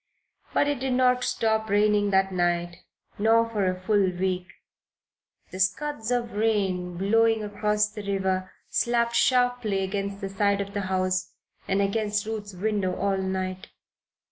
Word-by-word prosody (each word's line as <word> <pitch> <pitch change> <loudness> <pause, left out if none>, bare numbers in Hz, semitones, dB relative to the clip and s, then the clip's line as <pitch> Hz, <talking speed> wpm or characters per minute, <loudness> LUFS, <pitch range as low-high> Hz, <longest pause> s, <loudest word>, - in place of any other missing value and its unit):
But 285 - +2
it 290 -2 -1
did 260 0 -1
not 250 0 +3
stop 220 -2 0
raining 205 0 +3
that 195 0 +2
night, 175 -1 0 0.4
nor 225 +2 +4
for 210 -4 -1
a 185 0 -3
full 200 0 +2
week. 180 0 -2 1.0
The 185 - -7
scuds 220 +5 -1
of 240 -1 0
rain, 195 -5 0
blowing 225 +3 +2
across 210 0 0
the 210 0 -8
river, 190 -1 -1 0.2
slapped 235 0 +1
sharply 245 -6 +2
against 195 +1 -3
the 195 -2 -4
side 200 +1 +1
of 200 0 -4
the 205 - -1
house, 185 -1 0 0.3
and 195 +1 +2
against 205 0 -1
Ruth's 210 -3 -5
window 200 -1 -1
all 200 -1 0
night. 185 0 -3
205 Hz, 145 wpm, -26 LUFS, 190-220 Hz, 1.0 s, nor